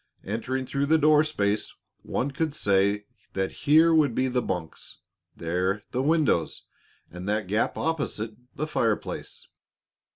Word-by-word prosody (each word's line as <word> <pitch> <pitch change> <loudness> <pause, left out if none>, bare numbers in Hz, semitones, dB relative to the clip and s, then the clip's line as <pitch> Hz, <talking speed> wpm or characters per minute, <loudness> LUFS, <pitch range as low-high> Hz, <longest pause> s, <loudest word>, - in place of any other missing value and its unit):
Entering 130 +6 -3
through 140 +2 -1
the 160 +2 +5
door 155 0 +5
space, 105 -9 -1 0.3
one 140 +3 -2
could 155 +1 -2
say 100 -4 +2 0.3
that 95 0 -1 0.2
here 160 +2 +7
would 145 -7 +3
be 130 - +2
the 125 -1 0
bunks, 90 -7 -5 0.4
there 90 +5 -1
the 125 - 0
windows, 145 - +1 0.5
and 90 +3 -6
that 105 -1 0
gap 105 +5 0
opposite, 140 -9 -2 0.2
the 155 - -2
fireplace. 115 -8 -2
120 Hz, 135 wpm, -26 LUFS, 100-150 Hz, 0.5 s, here